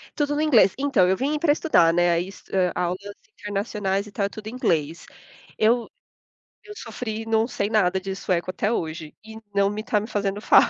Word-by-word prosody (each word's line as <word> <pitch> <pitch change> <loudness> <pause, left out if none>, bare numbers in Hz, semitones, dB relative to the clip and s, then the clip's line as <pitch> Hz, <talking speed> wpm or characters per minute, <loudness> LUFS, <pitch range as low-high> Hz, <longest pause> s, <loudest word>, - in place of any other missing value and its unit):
Tudo 290 -1 0
no 295 - 0
inglês. 260 -11 +4
Então 275 -9 +3
eu 190 - +2
vim 295 +5 -1
pra 300 -1 +3
estudar, 290 - +4
né, 170 0 +2
e 180 - -6 0.2
ai 185 -2 +2
aulas 180 +1 -1 0.4
internacionais 200 -1 -2
e 210 - -12
tal, 200 0 -1
tudo 215 +1 -10
em - - -5
inglês. 165 - -1 0.5
Eu 230 +2 +2 0.7
eu 420 - -11
sofri, 225 - -5
não 225 0 +2
sei 205 -4 -2
nada 190 -4 +2
de 190 0 -5
sueco 185 -2 -1
até 205 +3 -1
hoje, 160 -6 -4
e 220 0 -10 0.2
não 200 0 +4
me 210 +1 -4
tá 215 -2 +1
me 210 - -6
fazendo 200 -2 -2
falta. - - +6
205 Hz, 195 wpm, -24 LUFS, 185-230 Hz, 0.7 s, falta